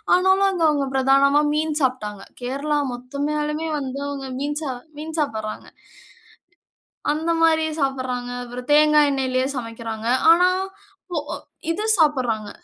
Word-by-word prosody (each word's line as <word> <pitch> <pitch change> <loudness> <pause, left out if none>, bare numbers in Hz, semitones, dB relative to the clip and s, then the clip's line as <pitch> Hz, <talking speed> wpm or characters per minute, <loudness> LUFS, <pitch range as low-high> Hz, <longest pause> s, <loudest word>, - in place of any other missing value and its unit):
ஆனாலும், 380 +2 +4
அங்க 365 -3 -1
அவுங்க 285 -2 0
பிரதானமா 275 +2 +4
மீன் 305 0 0
சாப்ட்டாங்க. 210 -7 -1 0.2
கேரளா 280 +4 -1
மொத்தமேயலுமே 300 +5 -3
வந்து 270 0 -5
அவுங்க 275 -2 -5
மீன் 290 +1 -2 0.4
மீன் 320 +1 -6
சாப்பிடறாங்க. 220 -7 -3 1.5
அந்த 320 +2 -2
மாரி 320 -1 +4 0.2
சாப்பிடறாங்க. 255 -2 -2 0.2
அப்புறம் 245 +1 -8
தேங்காய் 300 -1 +5
எண்ணெயிலயே 260 -1 0
சமைக்கிறாங்க. 230 -1 -5 0.2
ஆனா 355 +2 +5 0.6
போ 335 - 0 0.5
இது 405 +6 -1
சாப்பிடறாங்க. 250 -9 +1
280 Hz, 115 wpm, -22 LUFS, 250-305 Hz, 1.5 s, தேங்காய்